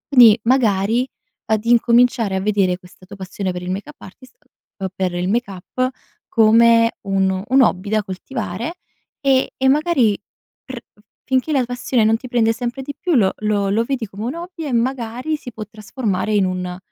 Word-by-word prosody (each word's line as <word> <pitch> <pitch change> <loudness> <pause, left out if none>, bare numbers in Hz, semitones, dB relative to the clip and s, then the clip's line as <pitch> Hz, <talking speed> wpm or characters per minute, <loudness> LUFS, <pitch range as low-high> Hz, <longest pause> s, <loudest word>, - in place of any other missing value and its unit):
Quindi, 235 -3 +8
magari 230 -1 +2 0.4
ad 220 -1 0
incominciare 235 -2 +3
a 190 - -1
vedere 195 -3 +1
questa 185 0 -18
tua 200 +2 -11
passione 190 0 -4
per 180 0 -6
il 180 +1 -4
make 195 +8 -5
up 300 - -15
artist 255 +7 -14 0.4
uhm, 195 - -3
per 185 -2 -1
il 175 +1 -2
make 235 +1 0
up, 255 +7 -3 0.4
come 230 +1 +5
un 190 -1 0
un 265 +2 +4
hobby 200 -4 +1
da 215 0 +1
coltivare, 230 - -5 0.5
e 270 -2 +2
e 265 - +1
magari 275 -7 +2 0.4
pr 260 -2 -8
f - - -34 0.2
finché 260 +4 0
la 270 -3 +2
passione 245 -1 0
non 220 +1 +3
ti 255 - -10
prende 235 -2 +2
sempre 245 +2 -4
di 285 +2 -6
più 355 -1 -1
lo 195 -6 +3
lo 210 -2 0
lo 215 +4 +2
vedi 255 -1 -2
come 200 +3 -7
un 255 +6 -3
hobby 340 -1 -7
e 275 - -3
magari, 250 +4 -1
si 250 - -10
può 215 - -6
trasformare 215 -2 -3
in 205 -2 +3
un 180 -1 -3
225 Hz, 190 wpm, -19 LUFS, 195-255 Hz, 0.5 s, Quindi